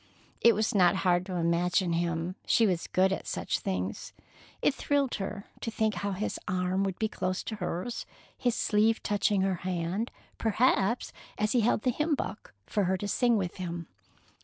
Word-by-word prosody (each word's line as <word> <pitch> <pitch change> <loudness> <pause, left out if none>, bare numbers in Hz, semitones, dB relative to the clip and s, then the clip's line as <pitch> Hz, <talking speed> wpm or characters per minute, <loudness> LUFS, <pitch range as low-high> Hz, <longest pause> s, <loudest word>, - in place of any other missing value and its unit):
It 235 -2 +6
was 215 +1 +1
not 180 -3 +5
hard 180 +1 +3
to 185 - -4
imagine 170 +1 +2
him. 170 +1 -1
She 230 - +5
was 180 -5 0
good 190 +1 +3
at - - -5
such - - -1
things. 95 +1 -3 0.5
It - - +3
thrilled 280 -1 0
her 200 +1 -4
to - - -3
think 220 -1 0
how 200 -2 -2
his 200 +3 -3
arm 185 +1 0
would 190 -2 -2
be 220 - +1
close 185 -3 -2
to 215 - -5
hers, 185 +5 -3 0.3
his 245 -2 0
sleeve 220 +1 +2
touching 205 -1 +2
her 190 -1 +1
hand, 180 +5 -2 0.3
perhaps, 225 0 +2 0.2
as 210 0 +1
he 245 - +3
held 220 0 +2
the 255 - +3
hymn 300 +4 +1
book 210 - -6
for 205 -2 0
her 190 +1 +1
to 205 - -4
sing 240 +2 +3
with 185 -2 -3
him. 170 -2 -5
195 Hz, 185 wpm, -29 LUFS, 180-220 Hz, 0.5 s, It